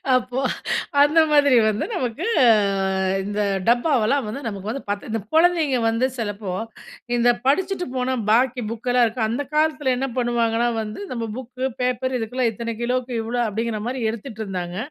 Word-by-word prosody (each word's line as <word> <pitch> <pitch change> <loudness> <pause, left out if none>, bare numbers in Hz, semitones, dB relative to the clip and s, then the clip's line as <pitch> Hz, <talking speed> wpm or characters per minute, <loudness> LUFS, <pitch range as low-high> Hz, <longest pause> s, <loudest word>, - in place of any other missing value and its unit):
அப்போ, 250 +1 -1 0.6
அந்த 300 +3 +5
மாதிரி 285 -3 +5
வந்து 215 0 0
நமக்கு 265 - -2 0.2
அ - - +6 0.8
இந்த 205 +1 -2 0.3
டப்பாவெல்லாம் 245 0 +2
வந்து 250 +7 -5
நமக்கு 200 -1 -5
வந்து 275 - -4
பத்து, 205 +2 -3
இந்த 225 - -1
குழந்தைங்க 320 -5 +3
வந்து 230 +3 +1
சிலப்போ 205 -4 -4 0.6
இந்த 240 0 +3 0.2
படிச்சுட்டு 360 +6 +1
போன 255 +1 0
பாக்கி 250 +3 +3
புக்கெல்லாம் 245 +2 +2
இருக்கும். 220 0 -1
அந்த 245 +6 -1
காலத்தில 300 -4 +2
என்ன 270 - -1
பண்ணுவாங்கன்னா 235 -1 +1
வந்து, 215 - -6
நம்ம 230 -2 -3
புக்கு 255 +1 -5 0.2
பேப்பர் 255 +1 0
இதுக்கெல்லாம் 230 +1 0
இத்தனை 230 +2 -4
கிலோவுக்கு 250 +1 -1
இவ்வளோ, 240 +2 -2
அப்படிங்கிற 220 0 -2
மாரி 255 0 -3
எடுத்துட்டுருந்தாங்க. 195 -7 -5
245 Hz, 150 wpm, -22 LUFS, 225-260 Hz, 0.8 s, அ